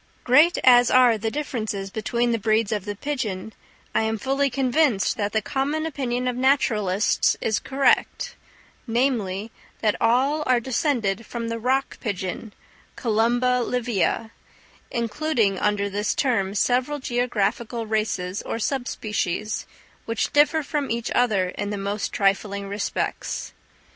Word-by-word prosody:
Great 295 +8 +5
as 245 -1 +7
are 250 -2 +6
the 220 +1 -2
differences 220 -8 -3
between 235 +3 0
the 230 - 0
breeds 215 0 +1
of 210 -3 -2
the 205 -1 -4
pigeon, 220 -7 -4 0.4
I - - +2
am 220 0 0
fully 275 +5 0
convinced 260 -3 +2
that 205 -1 -1
the 220 -1 0
common 290 +5 -1
opinion 255 -5 -2
of 250 - -1
naturalists 215 -7 +2
is 220 - 0
correct, 275 0 +1 0.5
namely, 225 -4 0 0.3
that 215 -2 +2
all 265 +7 +3
are 255 -1 +4
descended 235 -5 0
from 230 -1 -4
the 230 0 -3
rock 265 +4 0
pigeon 200 0 -4 0.4
(Columba 240 +2 +2
livia), 230 -2 -1 0.6
including 235 -4 0
under 205 -1 +1
this 205 +1 -1
term 205 -8 0
several 255 +7 +1
geographical 240 -2 -1
races 215 -3 -1
or - - -4
sub 245 +2 -2
species, 215 -1 -2 0.4
which 230 -1 -2
differ 295 +2 +4
from 290 -1 -2
each 235 0 -2
other 210 -7 +2
in 205 +2 -4
the 205 - -3
most 200 +1 -3
trifling 200 0 0
respects. 200 +1 -3
230 Hz, 135 wpm, -24 LUFS, 205-255 Hz, 0.6 s, as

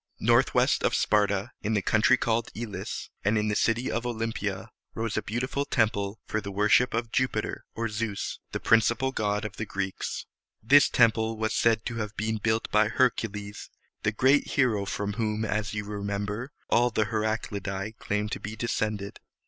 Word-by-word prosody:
Northwest - - +3
of - - +2
Sparta, 105 +1 +1
in 110 +1 0
the 100 - +2
country 110 +6 +4
called 115 -1 0
E´lis 110 -3 -5
and 105 +2 +2
in 105 0 +1
the 105 - 0
city 115 +4 +1
of 115 - -1
O 120 - -1
lym´pi 115 -2 -2
a, 95 +4 -9 0.2
rose 115 -1 -2
a - - +1
beautiful 125 +6 -2
temple 105 -5 0
for 110 - -2
the 100 - -6
worship 105 +5 +3
of 115 0 -2
Ju´pi 130 -1 +1
ter - - -5
(or 115 0 -1
Zeus), 105 -1 -3
the - - -3
principal 115 +4 +3
god 105 -3 -1
of 105 -2 -6
the 110 - -3
Greeks. 95 -1 -3 0.4
This 140 +6 +6
temple 110 -1 +3
was 110 0 -1
said 115 -2 +2
to 115 - -3
have 105 -2 -4
been 110 +1 -1
built 110 +1 0
by 105 0 +4
Hercules, 105 -4 -1 0.3
the 105 - +1
great 130 +6 +3
hero 115 -7 +1
from 100 +1 -3
whom, 110 0 -1
as 105 0 -2
you 105 -1 -3
remember, 105 +4 -3 0.2
all 120 +1 +3
the 110 -2 +1
Heraclidæ 105 -1 -3
claimed 105 +1 -2
to - - -3
be 105 +1 -6
descended. 105 -3 -2
110 Hz, 180 wpm, -27 LUFS, 105-115 Hz, 0.4 s, This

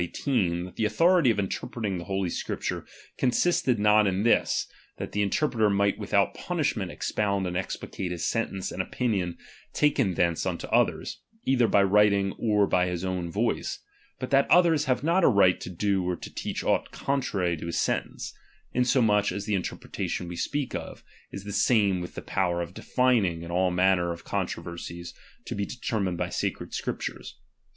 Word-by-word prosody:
18, 90 -4 0
that 90 - -11
the 110 - +1
authority 165 +7 +4
of 110 - +2
interpreting 100 0 -3
tlie 85 - -7
Holy 95 -2 -1
Scriptures - - -4 0.3
con 130 - +3
sisted 130 -3 +2
not 105 0 +4
in 95 +1 0
this, 115 - +2 0.3
that - - -5
the 105 - 0
interpreter 110 +1 +2
might 100 0 +1
without - - +1
punishment - - -2
expound 100 -2 -1
and 90 -1 -3
explicate 90 0 -4
his 85 -1 -3
sentence 100 -5 -2
and 95 - -2
opinion 95 -5 -1 0.4
taken 135 - +2
thence 85 -1 +1
unto - - -3
others, - - +1 0.2
either 125 -3 +3
by 100 - +4
writing 100 0 +4
or 105 -3 +3
by 90 -2 +2
his 90 0 -3
own 90 -2 -2
voice; 115 +6 -1 0.4
but 130 0 -5
that 135 0 +4
others 165 -3 +5
have 130 -1 0
not 170 +4 +3
a - - +7
right 100 -6 +4
to - - -6
do 95 +1 0
or 90 0 -1
teach - - -5
aught - - +1
contrary 100 -11 -1
to 85 - -7
his 85 - -2
sentence; - - -2 0.4
inso 125 +1 +3
much 105 -2 +3
as 100 +2 -4
the 105 - -1
interpretation 90 -1 -3
we 90 - -6
speak 145 +9 -2
of, - - -6 0.3
is 100 - -7
the 100 0 -6
same 100 -5 +3
with 90 - -7
the - - -6
power 90 -2 0
of 85 +1 -9
defining 105 -12 +1
in 85 - -7
all 90 +1 +2
manner 90 -1 +2
of 85 0 -7
con - - -1
troversies 85 0 -7 0.3
to - - -4
be 100 - -2
determined 100 -5 -2
by - - -1
sacred - - -3
Scriptures. - - -4
100 Hz, 180 wpm, -27 LUFS, 90-120 Hz, 0.4 s, a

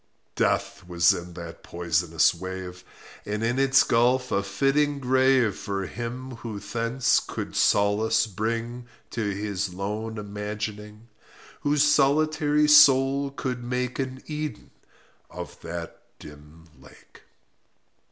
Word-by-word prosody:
Death 100 0 0
was 85 -1 +4
in 85 0 -7
that 85 -1 -9
poisonous 85 -1 +1
wave, 90 0 -7 0.4
And 105 +1 -3
in 120 +3 0
its 135 0 +5
gulf 125 +2 +2
a 100 - +2
fitting 135 +9 +1
grave 130 -3 +3
For 100 -1 -4
him 120 +4 -6
who 115 -2 -6
thence 115 +3 +1
could - - -6
solace 105 +3 +3
bring 115 +4 -4 0.2
To 115 - -3
his 100 -2 -3
lone 105 +3 -4
imagining— 105 +1 -6 0.5
Whose 145 0 +2
solitary 150 +1 +3
soul 140 -1 +6
could 130 -3 -4
make 125 +1 -3
An 130 -1 -4
Eden 150 -1 -6 0.6
of - - -9
that 85 0 -7 0.2
dim 75 +2 -14
lake. - - -18
115 Hz, 115 wpm, -25 LUFS, 100-130 Hz, 0.6 s, soul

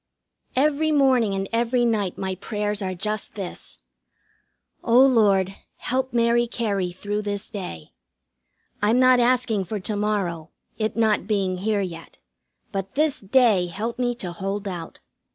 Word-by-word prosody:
Every 300 +3 +2
morning 260 -8 +3
and 195 0 -2
every 240 +1 +2
night 210 -6 0
my 190 -1 -2
prayers 210 +2 -3
are 185 -1 -2
just 210 +4 -3
this: 195 - -5 1.1
"O 235 +1 +5
Lord, 200 -7 +3 0.2
help 260 +1 -1
Mary 235 0 +3
Cary 200 -6 -1
through 205 +4 -3
this 205 0 -4
day. 180 - -7 0.9
I'm 215 +4 +3
not 255 0 +6
asking 240 -5 +2
for 210 +3 -4
to 210 +3 -2
morrow, 195 -6 -1 0.3
it 215 0 -1
not 220 -3 +2
being 195 -4 0
here 210 +1 0
yet. 170 -3 -7 0.5
But 195 -1 -4
This 300 -1 +1
Day 205 -3 +3
help 220 +8 -4
me 245 -1 0
to 185 -7 -5
hold 195 +3 -4
out." 175 -4 -6
210 Hz, 145 wpm, -24 LUFS, 195-240 Hz, 1.1 s, not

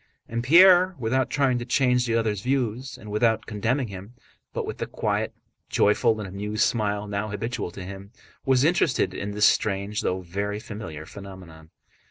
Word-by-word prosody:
And 115 +1 -3
Pierre, 180 +5 +7
without 130 +2 0
trying 135 -3 +1
to - - -4
change 125 -1 +2
the 115 - +1
other's 110 -4 0
views 125 0 -2
and 105 -4 -10
without 110 +1 +1
condemning 115 +4 -1
him, 100 +5 -10 0.4
but - - -3
with - - -6
the - - -3
quiet, - - -1 0.4
joyful, 110 +2 +3
and 105 - -5
amused 105 +3 -2
smile 105 -2 0
now 100 +1 -2
habitual 105 -1 -3
to 90 +2 -9
him, 100 +1 -9 0.3
was 130 -1 +3
interested 150 - +2
in 100 - -4
this 105 +1 +3
strange 100 0 +1
though 95 +1 -1
very 100 +4 -3
familiar 105 -9 -8
phenomenon. 90 -5 -11
110 Hz, 170 wpm, -25 LUFS, 100-125 Hz, 0.4 s, Pierre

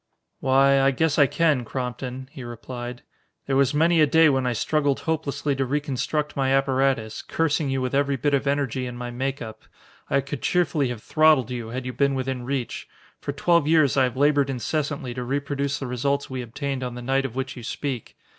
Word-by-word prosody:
"Why, 135 +1 +4
I 135 - +5
guess 150 +3 +1
I 140 - +7
can, 155 -6 +2
Crompton," 125 +1 -5
he 135 -5 -9
replied. 120 +1 -7 0.4
"There 135 - 0
was 140 +1 +3
many 165 +2 +4
a 155 - +6
day 160 +2 +5
when 130 -2 +1
I 125 - +1
struggled 145 +4 0
hopelessly 150 -3 -1
to 135 - +1
reconstruct 145 +2 -2
my 135 -1 +1
apparatus, 135 -4 +1
cursing 155 -2 0
you 135 0 0
with 130 - -2
every 140 0 +2
bit 140 +3 0
of 140 0 +1
energy 135 -3 0
in 120 0 -7
my 120 0 -5
make 135 +3 -3
up. 110 -1 -9 0.5
I 140 - +2
could 140 -2 -6
cheerfully 155 -4 +1
have 120 -3 -6
throttled 155 -6 +4
you, 120 -2 -4
had 125 +3 -5
you 125 - -4
been 140 +1 +1
within 130 -1 -3
reach. 130 -2 -3 0.3
For - - -4
twelve 170 +2 +2
years 155 -4 +4
I 135 -2 +4
have 125 -1 -4
labored 145 -1 +3
incessantly 135 +1 -2
to 125 0 -4
reproduce 140 +1 -2
the 135 - -5
results 140 +3 -1
we 130 -1 -3
obtained 135 +3 -4
on 125 -1 -4
the 125 - -7
night 135 +2 +1
of 125 -3 -5
which 130 0 -3
you 125 - -8
speak. 125 0 -5
135 Hz, 205 wpm, -24 LUFS, 125-145 Hz, 0.5 s, I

